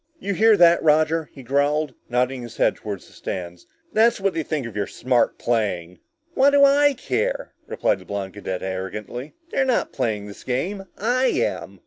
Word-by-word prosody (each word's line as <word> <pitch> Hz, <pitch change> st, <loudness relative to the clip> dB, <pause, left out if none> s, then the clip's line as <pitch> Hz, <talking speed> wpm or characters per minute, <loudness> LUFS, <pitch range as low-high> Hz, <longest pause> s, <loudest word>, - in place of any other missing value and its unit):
"You 200 Hz, -, -2 dB
hear 215 Hz, +2 st, +5 dB
that, 170 Hz, 0 st, +6 dB
Roger?" 155 Hz, 0 st, +2 dB
he 135 Hz, -, -12 dB
growled, 145 Hz, +2 st, +1 dB, 0.2 s
nodding 125 Hz, +1 st, 0 dB
his 120 Hz, -1 st, -9 dB
head -, -, +3 dB
toward 100 Hz, -3 st, -6 dB
the -, -, -18 dB
stands. 90 Hz, -2 st, -6 dB, 0.3 s
"That's 230 Hz, +1 st, +4 dB
what 195 Hz, -1 st, 0 dB
they 165 Hz, -, -1 dB
think 150 Hz, -3 st, -3 dB
of 115 Hz, -3 st, -8 dB
your 100 Hz, -1 st, -1 dB
smart 125 Hz, -1 st, +1 dB
playing!" 90 Hz, -7 st, -1 dB, 0.3 s
"What 275 Hz, -2 st, +5 dB
do 280 Hz, 0 st, +6 dB
I 285 Hz, +1 st, +5 dB
care?" -, -, -2 dB
replied -, -, 0 dB
the -, -, -15 dB
blond 100 Hz, -2 st, -4 dB
cadet 95 Hz, -2 st, -5 dB
arrogantly. 95 Hz, +8 st, -5 dB, 0.2 s
"They're 270 Hz, -, +2 dB
not 260 Hz, -2 st, 0 dB
playing 105 Hz, -3 st, -1 dB
this 100 Hz, -1 st, -11 dB
game! 185 Hz, +11 st, -2 dB
I 245 Hz, +5 st, +1 dB
am!" -, -, -2 dB
140 Hz, 180 wpm, -23 LUFS, -, 0.3 s, that